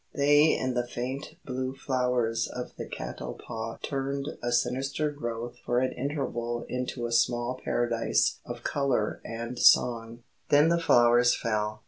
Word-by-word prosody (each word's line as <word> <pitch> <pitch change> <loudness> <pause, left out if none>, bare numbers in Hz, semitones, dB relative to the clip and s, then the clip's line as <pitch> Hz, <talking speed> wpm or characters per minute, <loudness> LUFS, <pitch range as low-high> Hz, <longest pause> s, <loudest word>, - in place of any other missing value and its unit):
They 145 +2 +5
and 130 -1 -2
the 120 0 0
faint 130 +4 -5
blue 130 0 -3
flowers 125 -4 0
of - - -7
the - - -6
catalpa 65 - -6
turned 140 0 -2
a 120 - -1
sinister 135 +5 0
growth 120 -4 -5
for 120 - 0
an 130 +1 +2
interval 125 -4 -3
into 125 -1 -3
a 120 - -3
small 120 +1 +1
Paradise 115 - +1
of - - -8
colour 135 -7 0
and 120 +2 -5
song. 115 -1 +4 0.3
Then 145 +2 +6
the 170 0 +2
flowers 120 -4 +5
fell. 105 -2 -2
120 Hz, 140 wpm, -28 LUFS, 115-135 Hz, 0.3 s, Then